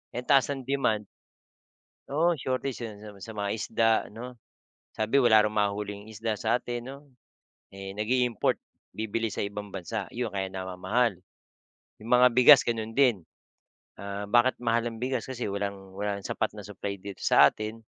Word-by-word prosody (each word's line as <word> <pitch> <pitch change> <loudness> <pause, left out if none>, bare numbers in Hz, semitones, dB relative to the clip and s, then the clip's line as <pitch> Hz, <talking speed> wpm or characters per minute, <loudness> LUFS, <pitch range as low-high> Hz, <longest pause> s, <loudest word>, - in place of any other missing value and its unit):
Eh, 125 - -3
ang - - -26
taas 135 -2 +5
ng 135 -2 -4
demand. 125 -6 0 1.0
Oo, 160 +2 +1
shortage, 130 +1 -2
yun. 105 -1 -11
Sa 105 - -9
mga 100 - -16
sa 110 - -6
mga 100 -1 -2
isda, 115 +1 +1 0.2
'no? 120 +3 -9 0.6
Sabi, 110 +6 +2
wala 110 -4 +6
raw 105 - 0
mahuling 105 0 -2
isda 110 0 -3
sa 110 +2 +2
atin 120 -1 -3
'no? 135 +1 -7 0.8
Eh, 95 0 -7
nag-i-import. 120 +1 +1 0.4
Bibili 110 +1 -2
sa 105 - -3
ibang 100 0 -6
bansa. 90 - -4
Yun 120 -2 -2
kaya 95 -1 -2
namamahal. 95 +3 -1 0.8
Yung 115 - -8
mga 125 +1 +7
bigas 125 +3 +8
ganun 115 -1 -2
din. 120 -10 +4 0.8
Ah, 100 0 -5
bakit 120 +2 +4
mahal 115 0 +1
ang 115 -1 -5
bigas? 125 -2 -1
Kasi 125 -2 -4
walang 100 -1 -5
walang 100 -1 -2
sapat - - -2
na - - -6
supply 100 0 -5
dito 100 0 -9
sa 70 - +6
atin 110 +1 -7
110 Hz, 165 wpm, -28 LUFS, 100-125 Hz, 1.0 s, bigas